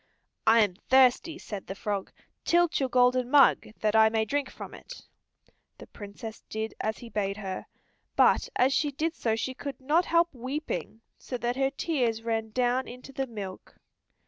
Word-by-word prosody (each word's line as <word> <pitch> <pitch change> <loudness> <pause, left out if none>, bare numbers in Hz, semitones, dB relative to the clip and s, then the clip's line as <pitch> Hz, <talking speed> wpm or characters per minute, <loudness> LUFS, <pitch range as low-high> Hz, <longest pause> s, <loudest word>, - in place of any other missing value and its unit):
"I 230 +1 +7
am 190 -4 +1
thirsty," 265 +5 +4
said 205 - -7
the 195 - -5
frog. 200 -1 -3 0.3
"Tilt 345 -1 +3
your 265 -2 0
golden 250 0 +3
mug 280 0 +5
that 215 0 +1
I 220 0 +7
may 220 0 0
drink 280 +4 -1
from - - -9
it." - - -11 0.7
The - - -11
Princess 210 +2 -9
did 220 +1 -3
as 220 0 -2
he 240 - -10
bade 200 -2 -2
her, 190 -3 -5 0.5
but - - +4
as 260 +2 +3
she 295 +2 +1
did 315 +4 -2
so 225 -8 -1
she 260 +3 -3
could 280 +1 -7
not 305 +7 +2
help 340 -1 +2
weeping 255 -2 -5 0.2
so 250 - -5
that 240 +1 -1
her 270 0 +1
tears 255 -7 -1
ran 225 -1 -1
down 250 +3 0
into 250 +3 -10
the 270 0 -2
milk. 200 -5 -8
245 Hz, 175 wpm, -28 LUFS, 220-275 Hz, 0.7 s, I